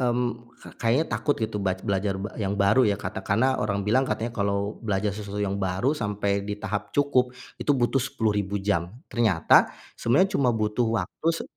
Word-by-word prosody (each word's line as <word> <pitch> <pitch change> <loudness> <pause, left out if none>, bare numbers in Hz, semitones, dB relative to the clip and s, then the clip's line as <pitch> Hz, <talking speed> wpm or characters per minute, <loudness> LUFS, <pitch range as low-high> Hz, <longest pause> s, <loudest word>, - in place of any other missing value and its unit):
mmm, 125 -1 +1 0.3
ka - - -11
kayaknya 120 +7 +2
takut 145 - +1
gitu 110 -1 -2
bac 95 -1 -1
belajar 100 0 0 0.2
yang 100 -1 -1
baru 100 +6 +4
ya, 100 - +1
katakanlah 115 +6 0
orang 100 -1 -1
bilang 125 +6 +3
katanya 110 +2 -2
kalau 100 -1 -1
belajar 105 -2 -1
susu 105 0 -5
yang 100 -1 -1
baru 95 +8 +1
sampai 105 -6 -1
di 105 0 -4
tahap 105 +1 -4
cukup 130 -3 +2 0.3
itu 145 - +2
butuh 130 +2 +2
10.000 105 -6 -1
jam, 95 -3 -1 0.2
ternyata 105 -9 +4 0.3
sebenarnya 185 - +2
cuma 130 - +2
butuh 110 +2 0 0.2
waktu - - -10
se - - -4
105 Hz, 170 wpm, -26 LUFS, 100-125 Hz, 0.3 s, baru